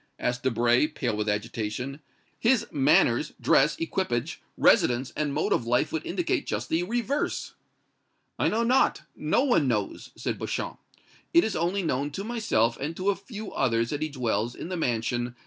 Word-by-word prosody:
asked 125 0 -1
Debray, 120 +2 +3
pale 125 -7 -2
with 105 0 -1
agitation. 115 +5 -3 0.4
"His 235 -1 +3
manners, 280 -1 +3
dress, - - +3
equipage, 190 - -2 0.2
residence 125 +2 +3
and 150 -2 -1
mode - - +1
of 115 - -1
life 120 +1 +2
would 160 - -2
indicate 175 -1 -1
just - - -3
the 165 - +1
reverse." 240 +8 -2 0.9
"I - - +3
know 230 +2 +1
not 255 +3 +2
no 155 +12 +1
one 240 - +3
knows," 105 -5 -2
said - - -3
Beauchamp. - - -3 0.6
"It 340 - +7
is 220 - -1
only 180 +4 0
known 145 -2 -1
to 195 - -4
myself 210 - +1
and 155 +4 -4
to 190 +2 +2
a - - -2
few 210 +1 -8
others 115 -3 +1
that 145 0 -3
he 155 - -1
dwells 120 -4 -1
in 170 - -7
the 185 - -2
mansion 120 -5 0
No. 120 0 -6
145 Hz, 175 wpm, -27 LUFS, 120-200 Hz, 0.9 s, It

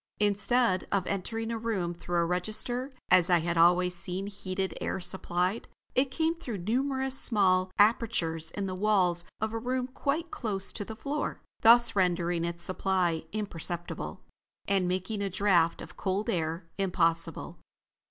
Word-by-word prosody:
Instead 210 0 +2
of 195 -2 +1
entering 225 +4 -3
a 230 - -3
room 200 -7 -2
through 175 0 -3
a 170 - +3
register, 215 +9 -1 0.2
as 180 0 +5
I 175 -2 +4
had 170 +1 -1
always 180 +2 +4
seen 180 +2 -2
heated 195 -1 -4
air - - -2
supplied, 180 +2 -1 0.3
it 260 +1 +2
came 320 +4 0
through 260 -11 -6
numerous 265 +7 0
small 185 -4 +3
apertures 205 -7 +2
in 200 +4 -3
the 190 - -3
walls 185 -3 +2
of 220 +1 -2
a 225 - -2
room 250 +2 -1
quite 285 +6 -2
close 200 -5 -3
to - - -3
the 220 +2 -8
floor, 285 +6 -3 0.2
thus 235 0 +6
rendering 175 -2 +1
its 170 0 -2
supply 180 -3 0
imperceptible, 175 -4 -4 0.4
and 195 -2 +2
making 185 +3 -2
a 200 - -1
draft 175 -3 +2
of - - -12
cold 200 +4 -1
air 165 -1 -2
impossible. 165 -3 +1
195 Hz, 150 wpm, -29 LUFS, 175-225 Hz, 0.4 s, thus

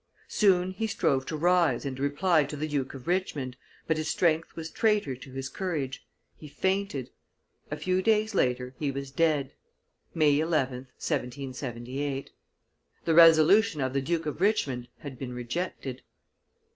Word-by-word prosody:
Soon 185 -3 +3
he 220 +4 -2
strove 135 -10 0
to 155 - -3
rise 175 -1 +2
and 130 -1 -4
reply 150 +4 +2
to - - -6
the 155 +2 -2
Duke 140 -3 -2
of 130 - -10
Richmond, 155 -8 -1 0.3
but 160 - +1
his 155 0 -2
strength 165 -2 +1
was 165 0 -6
traitor 210 - +1
to 130 +1 -12
his 135 0 -4
courage, 150 -7 -4 0.3
he 155 - -11
fainted; 190 -3 -1 0.6
a - - -3
few 185 0 0
days 215 +1 +2
later 125 -6 0
he 145 - 0
was 140 0 -5
dead 150 -2 +1 0.6
(May 150 -3 +4
11th, 135 -6 0
1778); 130 +1 -4 0.7
the 165 - +2
resolution' 165 +4 +6
of 130 -1 -1
the 135 - +1
Duke 165 +3 -1
of 150 +2 -4
Richmond 135 - +1
had 135 -4 -8
been 125 -2 -5
rejected. 130 +1 -4
150 Hz, 150 wpm, -28 LUFS, 135-175 Hz, 0.7 s, resolution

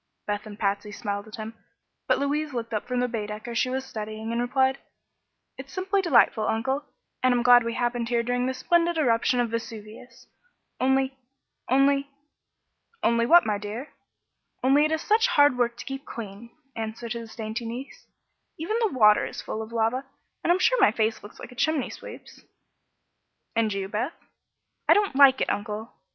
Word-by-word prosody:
Beth 205 +1 -3
and 205 -1 -9
Patsy 205 0 -1
smiled 205 -1 -4
at 215 - -9
him, 220 0 -7 0.5
but - - +3
Louise 295 +1 -1
looked 230 -1 -4
up 210 - -2
from 250 -1 -1
the 250 - +1
Baedecker 215 0 -5
she 255 +2 +1
was 265 +1 -2
studying 220 -1 -6
and 235 +1 0
replied: 265 +2 +1 0.8
"It's 265 0 -9
simply 385 +1 0
delightful, 235 - +3
Uncle, 265 +6 -1 0.4
and 255 - +4
I'm 245 -1 +2
glad 245 -1 +7
we 230 0 -3
happened 240 -1 -1
here 235 -1 +1
during 245 +1 0
this 260 0 -3
splendid 345 +3 +2
eruption 245 -3 +2
of 240 -2 0
Vesuvius. 230 +2 -7 0.5
Only 265 +1 +2 0.5
only 275 +2 +3 0.5
" 465 - -42
"Only 235 0 +3
what, 345 +4 +7
my 210 -2 0
dear?" 215 +7 -7 0.7
"Only 275 +3 +5
it 310 - 0
is 315 0 -1
such 445 +3 +3
hard 290 - +5
work 240 -1 0
to - - -8
keep 270 0 -6
clean," 230 -3 -8 0.3
answered 225 +1 -4
his 230 -1 -8
dainty 225 +1 -4
niece. 245 +4 -8 0.5
"Even 355 +8 -2
the 435 - 0
water 210 -2 +5
is - - -7
full 220 - -4
of 220 +1 -8
lava, 230 +3 0 0.4
and - - +3
I'm 355 - +4
sure 470 +5 +3
my - - +6
face 220 0 0
looks 205 - -13
like - - -9
a - - -13
chimney 310 0 0
sweep's." - - -11 1.1
"And 225 -1 +2
you, 195 -1 -3
Beth?" 215 - -2 0.8
"I - - +8
don't 410 -8 +1
like 270 -1 +7
it, - - +1
Uncle. 210 +2 -4
240 Hz, 180 wpm, -26 LUFS, 220-275 Hz, 1.1 s, I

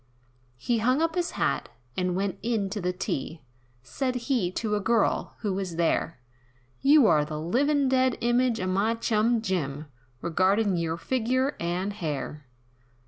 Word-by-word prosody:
He 230 - 0
hung 255 +5 +2
up 330 0 +1
his 350 0 0
hat, - - 0 0.3
and 180 -1 0
went 195 0 -2
in 215 -4 -1
to 210 -1 -3
the 180 0 0
tea, 160 -3 -4 0.4
Said 255 - -2
he 240 -6 0
to 210 0 -1
a - - 0
girl, 225 +2 +1
who 205 -3 -1
was 185 -3 -3
there, 165 -2 0 0.6
"You're 270 - +5
the 150 0 -5
livin' 275 - +2
dead 260 -1 +2
image 240 0 +2
of 185 - -1
my 210 +5 +1
chum 230 0 +1
Jim, 155 -7 -2 0.3
Regardin' 190 +5 +2
yer 165 -1 -1
figure, 255 - 0
and 180 +4 -2
hair." 150 -4 -5
205 Hz, 150 wpm, -27 LUFS, 175-245 Hz, 0.6 s, You're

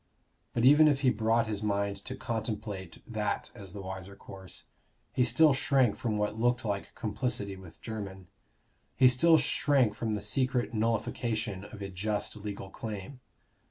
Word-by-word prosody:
But 115 - +2
even 150 +3 +8
if 140 -2 +2
he 130 -3 +4
brought 115 +1 +2
his 105 -2 -3
mind 100 -1 0
to 130 - -4
contemplate 110 -7 -4
that 105 -3 -2
as 100 -3 -10
the 100 0 -7
wiser 95 +1 -7
course, 95 -1 -11 0.5
he 125 - +3
still 150 +4 +5
shrank 135 -5 +3
from 110 -3 -2
what 105 +1 -1
looked 120 0 +1
like 100 -2 -3
complicity 105 -2 -2
with 95 -4 -13
Jermyn; 100 -4 -6 0.7
he 130 - +7
still 160 +7 +5
shrank 135 -8 +2
from 110 -1 -2
the 105 - -4
secret 130 -3 0
nullification 110 -2 -1
of 105 -1 -9
a 100 - -4
just 105 +4 -2
legal 100 -2 -6
claim. 110 +5 -6
110 Hz, 160 wpm, -30 LUFS, 100-125 Hz, 0.7 s, even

